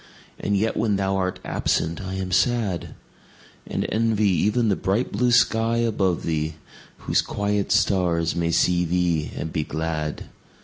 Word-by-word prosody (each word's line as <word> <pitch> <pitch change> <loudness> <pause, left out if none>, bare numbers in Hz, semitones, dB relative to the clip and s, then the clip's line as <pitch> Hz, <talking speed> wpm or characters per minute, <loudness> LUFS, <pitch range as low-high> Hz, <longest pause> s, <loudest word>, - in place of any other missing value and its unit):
And 100 0 0
yet 110 +3 0
when 110 -3 +1
thou 95 0 0
art 95 -1 -2
absent 85 +4 -1
I 95 0 -5
am 95 -1 -4
sad; 105 -2 0 0.7
And - - -2
envy 110 -2 +2
even 105 +6 +2
the 100 - +2
bright 95 +7 -1
blue 125 -1 +1
sky 115 -1 +3
above 100 -7 0
thee, 80 -1 -2 0.5
Whose - - +3
quiet 100 0 -1
stars 85 -4 +2
may 85 -1 0
see 90 +1 +2
thee 85 -3 0
and 80 - -4
be 75 - 0
glad. 80 -1 -3
95 Hz, 150 wpm, -23 LUFS, 85-105 Hz, 0.7 s, sky